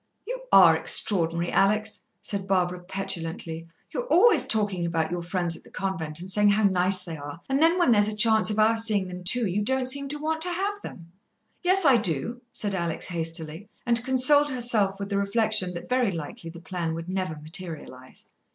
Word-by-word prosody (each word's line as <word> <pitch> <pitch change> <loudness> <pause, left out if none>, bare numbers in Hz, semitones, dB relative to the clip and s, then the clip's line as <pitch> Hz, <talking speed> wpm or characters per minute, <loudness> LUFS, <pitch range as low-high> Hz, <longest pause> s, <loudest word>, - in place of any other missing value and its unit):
"You - - -6
are - - +7
extraordinary, 170 -3 +1
Alex!" 215 +2 +1 0.2
said 195 -2 -4
Barbara 180 -2 0
petulantly. 170 -3 -4 0.3
"You're - - -4
always 465 +3 +4
talking 205 -5 0
about 165 -1 -2
your 175 0 -3
friends 175 -1 -2
at - - -14
the - - -17
convent 170 -5 -3
and 180 - -8
saying 210 +1 +3
how 210 +2 +2
nice 185 -1 +2
they 165 -3 -7
are, 145 +2 -9
and 270 +2 0
then 330 +2 +4
when 345 -9 +3
there's 205 -2 +4
a 215 - -3
chance 220 0 +3
of 210 - -2
our 220 +1 +3
seeing 215 -4 +2
them 180 0 -8
too, 235 +6 +2
you 200 +1 -1
don't 255 +3 +1
seem 280 +1 +2
to 295 +2 -3
want 315 +2 -3
to 355 +2 +1
have 400 +3 -3
them." 170 - -11 0.5
"Yes, 370 0 +3
I 270 -4 +6
do," 220 - -1
said 205 -2 -4
Alex 170 -3 -2
hastily, 165 +2 -3 0.2
and 235 0 +2
consoled 265 +3 +4
herself 230 -7 0
with 200 0 -5
the 200 -1 -1
reflection 200 -3 +1
that 170 - -8
very 250 -4 +1
likely 165 0 -7
the 170 +1 -11
plan 170 -1 -4
would 165 +1 -7
never 185 -3 -3
materialize. 155 -5 -7
195 Hz, 195 wpm, -25 LUFS, 170-240 Hz, 0.5 s, are